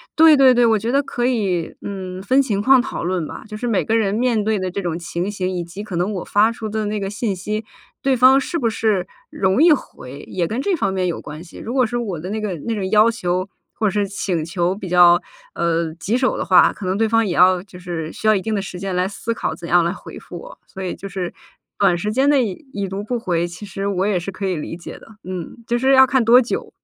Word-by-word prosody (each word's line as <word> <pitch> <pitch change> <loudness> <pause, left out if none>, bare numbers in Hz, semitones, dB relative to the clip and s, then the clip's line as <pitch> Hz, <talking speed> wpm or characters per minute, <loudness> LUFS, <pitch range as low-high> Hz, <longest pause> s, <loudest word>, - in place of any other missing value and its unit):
对 315 -2 +7
对 260 -2 +7
对， 245 - +3
我 225 -2 +4
觉 225 +4 -2
得 275 +2 +3
可 245 -3 -3
以， 195 -9 -1
嗯， 185 -2 -6
分 255 +7 +2
情 210 -7 +1
况 265 +3 +6
讨 250 - -3
论 175 -2 -1
吧， - - -9
就 215 -1 -7
是 245 - -5
每 225 -5 +1
个 225 0 +1
人 200 -3 +1
面 230 -1 +1
对 215 -1 0
的 185 - -2
这 185 - -4
种 175 -3 -3
情 175 +3 -3
形， 185 -2 -2
以 180 -2 -3
及 180 +5 -8
可 200 -4 -6
能 180 +5 0
我 185 - -4
发 210 +2 +3
出 225 -2 -6
的 215 0 -2
那 210 0 -2
个 195 0 -3
信 210 -1 -2
息， 210 +4 -4 0.4
对 270 -1 +3
方 255 +2 +6
是 335 +5 -3
不 235 - +1
是 215 -4 0 0.2
容 190 +7 +1
易 345 - +7
回， 140 - -3
也 175 -2 -1
跟 230 +8 -2
这 390 +3 +1
方 195 - -1
面 185 -1 0
有 175 - -3
关 150 +3 -9
系。 175 - -14
如 235 - -6
果 260 -1 +3
是 240 +1 -1
我 200 -9 -3
的 180 +4 -6
那 215 +2 -3
个 210 -4 -3
那 230 - 0
种 195 -3 -2
要 215 +2 +6
求 185 -4 -2 0.2
或 215 - 0
者 - - -4
是 205 0 0
请 185 -5 -2
求 175 +2 -1
比 195 -2 -7
较， 175 0 +6 0.4
呃， 165 -1 0
棘 200 +7 -2
手 255 0 +1
的 - - -2
话， 185 -1 +6
可 200 - -8
能 185 +1 0
对 220 +1 +1
方 225 0 +3
也 185 - -1
要 180 0 +5
就 185 -3 -14
是 170 -3 -5
需 220 - -3
要 215 - +6
一 195 - 0
定 220 +2 -3
的 200 - 0
时 185 -2 -7
间 190 0 -3
来 180 +1 +1
思 225 +3 -4
考 - - -3
怎 170 - -9
样 175 0 +4
来 170 - 0
回 190 - -10
复 - - -10
我。 - - -12
所 190 -1 -8
以 180 - -3
就 195 - -8
是 180 -1 -4 0.5
短 195 -4 +3
时 210 +5 -2
间 265 +5 +2
内 275 -4 +4
已 220 - -7
已 200 -1 -2
读 195 +2 -5
不 245 +3 -2
回， 175 -5 -1
其 175 +4 -9
实 195 0 -4
我 190 -1 0
也 205 -3 +1
是 180 +3 -5
可 195 +1 -5
以 185 -2 0
理 160 +2 -5
解 175 - -9
的。 - - -17 0.2
嗯， 180 +1 -6
就 240 - -1
是 265 +2 +3
要 265 0 +8
看 260 -1 +2
多 235 +2 +7
久。 235 - -4
200 Hz, 295 characters per minute, -20 LUFS, 180-230 Hz, 0.5 s, 要